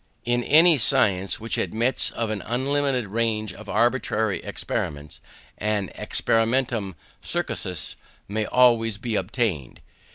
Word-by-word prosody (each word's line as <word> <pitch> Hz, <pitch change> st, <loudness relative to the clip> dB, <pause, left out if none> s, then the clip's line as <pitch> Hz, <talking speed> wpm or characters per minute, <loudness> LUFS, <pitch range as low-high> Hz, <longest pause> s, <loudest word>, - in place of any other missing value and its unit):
In 120 Hz, 0 st, +1 dB
any 160 Hz, +2 st, +6 dB
science 100 Hz, -4 st, +2 dB
which 115 Hz, 0 st, -3 dB
admits 120 Hz, +4 st, +1 dB
of 115 Hz, -2 st, -3 dB
an 105 Hz, -, -3 dB
unlimited 130 Hz, -2 st, 0 dB
range 110 Hz, -1 st, -1 dB
of 105 Hz, +1 st, -12 dB
arbitrary 110 Hz, -5 st, +1 dB
experiments, 75 Hz, 0 st, -4 dB, 0.4 s
an 105 Hz, -2 st, -1 dB
experimentum 115 Hz, -4 st, 0 dB, 0.3 s
crucis 90 Hz, -5 st, -2 dB, 0.3 s
may 105 Hz, +1 st, -2 dB
always 115 Hz, -4 st, +3 dB
be 115 Hz, 0 st, -3 dB
obtained. 95 Hz, -, -2 dB
110 Hz, 110 wpm, -24 LUFS, 100-120 Hz, 0.4 s, any